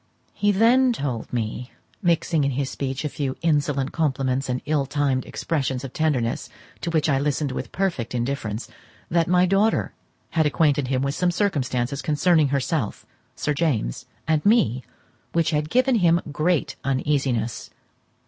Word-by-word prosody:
He 205 0 +2
then 240 +6 +4
told 135 - -4
me, 120 +1 -3 0.3
mixing 170 -2 +2
in 140 - +2
his 135 0 -2
speech 135 +1 -3
a - - +2
few 135 -2 -3
insolent 145 -4 +1
compliments 135 -4 0
and 125 0 0
ill 145 -2 0
timed 140 -2 0
expressions 135 -5 -2
of 135 - -7
tenderness, 135 -7 0 0.3
to - - -2
which 160 -2 +1
I 140 -3 +2
listened 145 0 0
with - - -5
perfect 170 -12 -2
indifference, 120 -3 -2 0.4
that 165 -1 +2
my 180 +1 +4
daughter 195 +4 +2 0.4
had 160 -2 +2
acquainted 145 -2 +2
him 130 0 0
with 140 0 0
some 180 +4 +1
circumstances 140 - -1
concerning 155 +1 +3
herself, 140 -3 -1 0.3
Sir 150 - -1
James, 140 - -1 0.2
and 155 -1 +2
me 130 - +3 0.5
which 165 -1 +2
had 150 0 0
given 255 +6 +3
him 170 -3 +4
great 155 -2 0
uneasiness. 135 -4 -1
145 Hz, 150 wpm, -24 LUFS, 130-165 Hz, 0.5 s, then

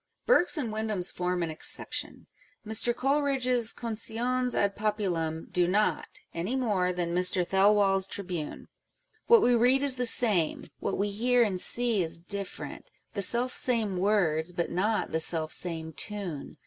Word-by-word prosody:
Burke's 360 -8 +4
and 240 -7 -3
Windham's 215 -4 -1
form 180 0 -2
an 165 - -3
exception: 155 - 0 0.4
Mr. 220 +2 +2
Coleridge's 260 -4 +1
Condones 240 +2 -2
ad 200 -1 0
Populnm 180 -7 -2
do 175 -1 +1
not, 205 +4 0 0.3
any 180 +10 -3
more 205 -8 0
than 175 -1 -3
Mr. 180 0 +3
Thelwall's 195 0 +3
Tribune. 180 -6 -6 0.6
What 465 -2 +6
we 245 - +4
read 250 +4 +3
is 270 -2 +4
the 250 0 +3
same: 205 -10 +1
what - - -3
we 205 +1 -1
hear 245 +4 +2
and 190 -5 -1
see 235 -4 +1
is 165 -1 -2
different 200 +2 -5
â€" - - -24
" - - -45
the 200 - -3
selfsame 235 -1 0
words, 180 -5 +1
but 170 -1 -3
not 210 +5 0
to - - -16
the 160 - 0
selfsame 160 0 -2
tune." 180 -2 -6
205 Hz, 155 wpm, -28 LUFS, 180-240 Hz, 0.6 s, What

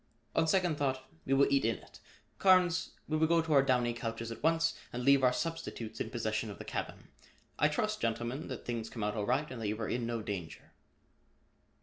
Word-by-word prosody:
On 160 - +3
second 175 -2 +2
thought, 130 -2 -1 0.2
we 135 - +3
will 140 - +6
eat 140 -1 +3
in 115 0 +2
it. - - -15 0.4
Carnes, 180 -3 +4 0.2
we 155 - 0
will 160 +1 +3
go 170 +1 +4
to 160 -1 0
our 140 - +7
downy 125 -3 +2
couches 115 -1 -4
at 115 - -7
once 165 +1 +3 0.2
and 125 +1 -4
leave 140 0 +5
our 125 - +6
substitutes 125 -8 -4
in - - -2
possession 110 -1 -2
of 100 - -7
the - - -8
cabin. - - -5 0.5
I 150 - +5
trust, 215 +8 -1
gentlemen, 120 +5 -2
that 130 - -6
things 115 -2 -3
come 115 - -5
out 105 0 0
all 105 -2 -2
right 130 +5 +2
and 120 -3 -6
that 110 - -1
you 105 +2 -2
are 110 - -2
in 120 -1 -1
no 115 -2 -2
danger." 95 -6 -6
125 Hz, 220 wpm, -32 LUFS, 115-155 Hz, 0.5 s, our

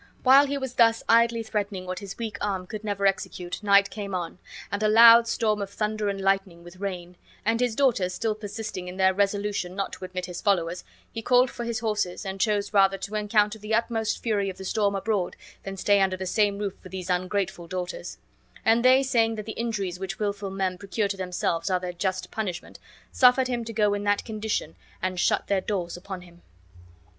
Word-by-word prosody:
While 275 +2 +7
he 280 +1 -2
was 265 -2 -4
thus 230 -2 +4
idly 230 0 +4
threatening 205 -3 -3
what 185 0 -4
his 200 -2 -8
weak 220 -3 -5
arm 195 -3 -2
could 215 +3 -7
never 200 -2 -2
execute, 190 -2 -1
night 200 -1 +4
came 200 -3 -5
on, 175 0 -4 0.3
and 200 - -2
a 215 - +3
loud 230 +2 +8
storm 215 -3 0
of 200 - -4
thunder 210 0 -2
and 200 0 -3
lightning 195 -3 0
with 175 +1 -13
rain; 180 -3 -5 0.3
and 225 +1 +2
his 245 -3 0
daughters 230 -9 +2
still 220 +4 -1
persisting 210 -3 -6
in 180 +1 -7
their 190 0 +4
resolution 200 -2 -1
not 195 0 -3
to - - -8
admit 185 0 -4
his 180 -1 -7
followers, 180 -4 0 0.3
he 225 - -5
called 250 +2 +4
for 240 - -6
his 230 -2 -2
horses, 210 -4 -2
and 190 0 -4
chose 210 -2 0
rather 195 -1 +4
to 195 +2 -7
encounter 210 0 +1
the 210 +1 -1
utmost 225 -1 -1
fury 205 -4 0
of 190 - -7
the 190 - -8
storm 200 0 +1
abroad 195 -2 -1 0.3
than 195 0 -7
stay 200 +1 +3
under 190 -1 +1
the 190 - -4
same 205 +1 +1
roof 200 -2 -3
with 185 - -12
these 185 -1 -4
ungrateful 180 -1 -1
daughters; 180 0 -5 0.5
and 230 +1 +4
they, 260 +1 +6
saying 230 -4 +2
that 215 -1 -6
the 220 - -5
injuries 205 -6 -3
which 190 -1 -5
wilful 205 -1 -2
men 190 -1 -2
procure 200 +1 -1
to 200 - -3
themselves 180 -2 -2
are 185 -1 +2
their 180 0 -5
just 185 0 -3
punishment, 190 -6 -5 0.3
suffered 255 0 +5
him 240 -2 -2
to 230 - -6
go 210 -2 +2
in 205 0 -2
that 205 0 +1
condition 215 -7 -3 0.2
and 185 0 -2
shut - - +2
their 195 -2 +1
doors 180 -4 -3
upon 185 +1 -7
him. 175 -1 -17
200 Hz, 210 wpm, -26 LUFS, 185-220 Hz, 0.5 s, loud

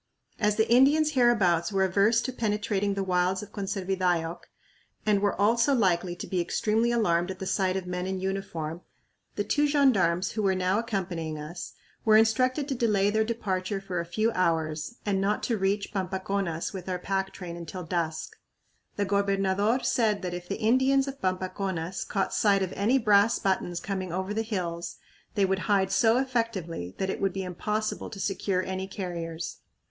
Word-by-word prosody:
As 210 -1 +2
the 220 +1 +2
Indians 285 +6 +5
hereabouts 215 - +3
were 195 -1 +2
averse 200 +5 +3
to 255 - -4
penetrating 205 -3 -1
the 195 - -1
wilds 185 +1 +1
of 210 - -11
Conservidayoc 185 -4 -1 0.7
and 210 -2 +3
were 205 -2 0
also 235 +6 +3
likely 180 -5 +1
to - - -6
be 185 -2 -1
extremely 220 +6 +1
alarmed 175 -7 +2
at 190 - -5
the 190 - -5
sight 190 -1 +1
of 190 - -4
men 180 0 -3
in 190 0 -2
uniform, 175 -4 -4 0.5
the - - 0
two 295 0 +2
gendarmes 200 - +3
who 215 - -2
were 195 -2 +2
now 185 +2 +1
accompanying 180 -8 -3
us 165 +4 -7 0.3
were 215 -1 +6
instructed 255 +6 +2
to 280 - -1
delay 210 -5 +2
their 220 +1 +2
departure 200 -4 -2
for 190 -3 -4
a 170 - -2
few 215 +6 +1
hours 160 0 -1
and 195 -2 +1
not 205 +2 0
to 235 - 0
reach 200 +1 -1
Pampaconas 190 -3 -2
with 190 -1 -6
our 180 - -1
pack 195 +1 -2
train 175 -2 -7
until 170 +2 -7
dusk. 165 -1 -3 0.6
The 205 - 0
gobernador 200 +3 +1
said 215 -4 +1
that 180 -1 -3
if 175 0 -7
the - - -2
Indians 260 +4 +3
of 275 0 -7
Pampaconas 185 -1 -2
caught 195 -2 -1
sight 200 -2 +3
of 185 - -4
any 225 +7 +2
brass 210 -2 +4
buttons 180 -3 -1
coming 185 -1 -4
over 190 +3 -2
the 220 - 0
hills 175 -6 -3 0.4
they 200 -2 +3
would 190 0 0
hide 195 -2 +3
so 225 +4 +4
effectively 225 - -2
that 190 0 -1
it - - -5
would 195 -2 +1
be 195 - -3
impossible 210 +4 -3
to 200 - -9
secure 195 -1 -1
any 190 0 -4
carriers. 170 -4 -5
195 Hz, 180 wpm, -27 LUFS, 180-215 Hz, 0.7 s, were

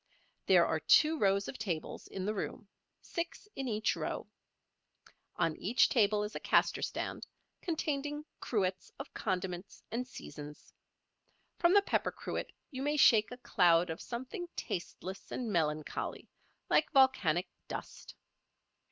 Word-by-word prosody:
There - - +7
are - - 0
two 315 +1 +5
rows 200 0 +3
of 260 - -6
tables 175 -7 -4
in 190 -1 -5
the 210 - 0
room, 210 +1 -4 0.4
six 335 +3 -5
in 270 -1 -3
each 215 -1 +1
row. - - -3 1.1
On 165 -3 +1
each 230 +7 +3
table 210 -3 +3
is 210 - -4
a - - -2
caster - - +3
stand, - - -3 0.3
containing 295 -3 -2
cruets 190 -5 -1
of 275 - -8
condiments 185 -1 -3
and 245 +3 -2
seasons. 150 - -10 0.9
From 350 +2 +5
the 405 - +7
pepper - - +1
cruet - - -4 0.2
you 260 -2 -5
may 295 +2 +1
shake 215 -7 +6
a 245 - -6
cloud 175 -7 +3
of 160 - -6
something 260 +9 -5
tasteless 190 +2 -5
and 230 -4 -3
melancholy, 155 -3 -1 0.4
like 305 - +3
volcanic 205 - +4 0.2
dust. - - -7
215 Hz, 135 wpm, -33 LUFS, 185-270 Hz, 1.1 s, There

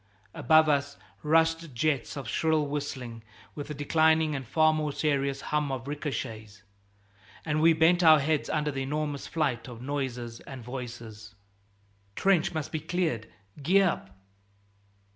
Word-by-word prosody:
Above 155 +4 +4
us 140 -1 0 0.2
rushed 165 -1 +2
jets 145 +1 -1
of 140 - -6
shrill 160 -2 +1
whistling, 135 -5 -5 0.3
with 145 - -6
the 150 - -5
declining 160 +2 +3
and 135 -3 -5
far 155 +4 +4
more 155 -1 -1
serious 140 -2 0
hum 150 -2 +1
of 130 -1 -5
ricochets. 115 -8 -5 0.8
And 155 -1 0
we 165 +1 +6
bent 165 +3 +4
our 160 -2 +8
heads 150 +1 0
under 150 0 0
the 135 -1 -4
enormous 145 +1 -3
flight 135 -8 -1
of 120 -2 -9
noises 125 -3 -4
and 130 -3 -10
voices. 115 -4 -8 0.8
"Trench 190 -4 +2
must 155 -3 -4
be 155 - -2
cleared 155 - -2 0.3
Gee 190 +7 +4
up!" 170 - -1
145 Hz, 145 wpm, -28 LUFS, 125-155 Hz, 0.8 s, our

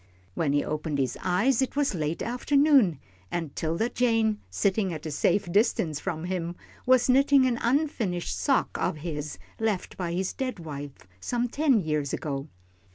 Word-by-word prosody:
When 150 - 0
he 145 0 +2
opened 150 -1 -2
his 130 -3 0
eyes, 225 +9 +2
it 265 - -1
was 285 -5 +1
late 155 -2 -2
afternoon, 255 - +3 0.3
and 165 - -4
'Tilda 165 +9 -1
Jane, 225 -4 +1
sitting 195 -1 +1
at 160 -1 -6
a 155 - -3
safe 175 +5 +1
distance 180 - +2
from 160 +1 -4
him, 175 -1 -3 0.3
was 255 -1 +5
knitting 275 +1 +5
an 245 -2 +1
unfinished 235 - 0
sock 275 -2 +1
of - - 0
his, 150 -2 -4 0.2
left 220 -4 -2
by 175 -2 -2
his 185 +1 -1
dead 255 -3 -3
wife 145 - -8
some 245 - -1
ten 270 -3 +2
years 150 -4 -1
ago. 140 -1 -3
185 Hz, 160 wpm, -27 LUFS, 155-245 Hz, 0.3 s, was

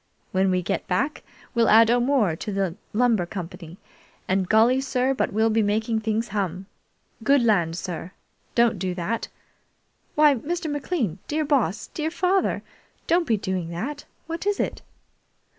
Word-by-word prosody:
When 190 0 +2
we 185 -1 +1
get - - -2
back, 275 - 0 0.3
we'll 235 -2 +3
add 225 +1 +7
O'More 240 - +2
to 210 - -5
the 195 -3 -1 0.2
Lumber 225 -5 +2
Company, 175 -2 -7 0.5
and 185 -1 0
golly, 235 +4 +4
sir, 260 0 +1
but 260 - -1
we'll 220 +2 +2
make 215 0 +2
things 220 0 -1
hum! 190 -2 -2 0.6
Good 275 +1 +4
land, 175 -7 +2
sir! 180 0 -5 0.4
Don't 235 -4 +3
do 180 -1 -2
that! 205 +6 -2 0.9
Why, 300 -1 +6
Mr. 315 +5 -3
McLean, 275 - -2
dear 310 +1 -1
Boss, 250 - +1
dear 310 0 -1
father, 370 +3 +1 0.4
don't 340 -1 +2
be 225 - +2
doing 185 -3 -3
that! 225 +13 -5 0.2
What 330 +4 -4
is 410 -1 +1
it?" - - -2
220 Hz, 150 wpm, -24 LUFS, 185-275 Hz, 0.9 s, add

